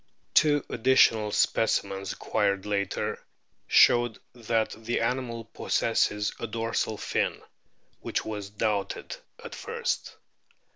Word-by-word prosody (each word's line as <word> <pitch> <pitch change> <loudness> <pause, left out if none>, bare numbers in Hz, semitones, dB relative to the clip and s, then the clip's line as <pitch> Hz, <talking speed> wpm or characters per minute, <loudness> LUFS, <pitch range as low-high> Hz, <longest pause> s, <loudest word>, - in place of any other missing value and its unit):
Two 145 -2 +4
additional 115 -3 +3
specimens 100 -3 +1
acquired 100 -2 0
later* 100 -2 -2 0.4
showed 120 -2 +5 0.2
that 115 -2 -1
the 115 +2 -2
animal 115 -1 -2
possesses 105 -2 0
a 115 - -3
dorsal 115 -1 -2
fin - - -1 0.6
(which - - -3
was 105 -2 -5
doubted 105 - -2 0.3
at - - -8
first). 470 +1 -3
110 Hz, 100 wpm, -27 LUFS, 105-120 Hz, 0.6 s, showed